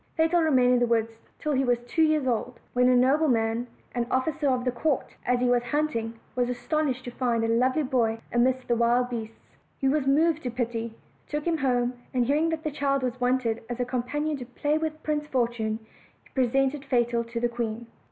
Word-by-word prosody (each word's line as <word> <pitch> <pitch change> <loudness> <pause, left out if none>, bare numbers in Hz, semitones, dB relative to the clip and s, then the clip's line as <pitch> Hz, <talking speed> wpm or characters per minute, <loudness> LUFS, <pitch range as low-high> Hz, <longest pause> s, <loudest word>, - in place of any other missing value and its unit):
Fatal 325 +2 +3
remained 255 -6 +4
in 250 - +4
the 240 - +2
woods 225 -1 0 0.2
till 305 - -2
he 270 -1 +2
was 245 -2 +2
two 245 +7 -1
years 310 -3 +3
old; 245 0 -1
when 250 0 +4
a 250 - +5
nobleman, 245 -3 +2 0.3
an 240 -1 -1
officer 280 +2 0
of 255 -1 0
the 250 - +2
court, 275 +4 -1
as 245 0 +2
he - - +2
was 245 0 +3
hunting, 240 -3 -1 0.2
was 245 -1 +1
astonished 255 +1 -1
to 245 - -5
find 240 -2 0
a - - +1
lovely 255 +6 +2
boy 240 -4 +1
in 240 0 +3
the 255 - +5
midst 260 -1 -4
of 235 - +2
wild 245 +1 +2
beasts. 225 -1 -5 0.4
He 270 - 0
was 275 0 +1
moved 315 +3 +3
to 250 - -3
pity, 230 -2 -3 0.3
took 295 0 -3
him 335 -2 +1
home, 245 -2 +1 0.2
and 245 -1 +3
hearing 300 +5 +2
that 320 -1 -3
a 305 - 0
child 275 -1 0
was 250 0 -3
wanted 245 -2 +1
as 240 0 -4
a 245 - +1
companion 285 +5 -2
to 250 - -7
play 290 +4 -1
with 315 0 -3
Prince 300 -1 -1
Fortune, 235 -5 0 0.5
he - - -23
presented 270 +2 +1
Fatal 240 -3 +1
to 230 0 -5
the 240 - +2
queen. 235 -1 -4
250 Hz, 215 wpm, -26 LUFS, 240-290 Hz, 0.5 s, a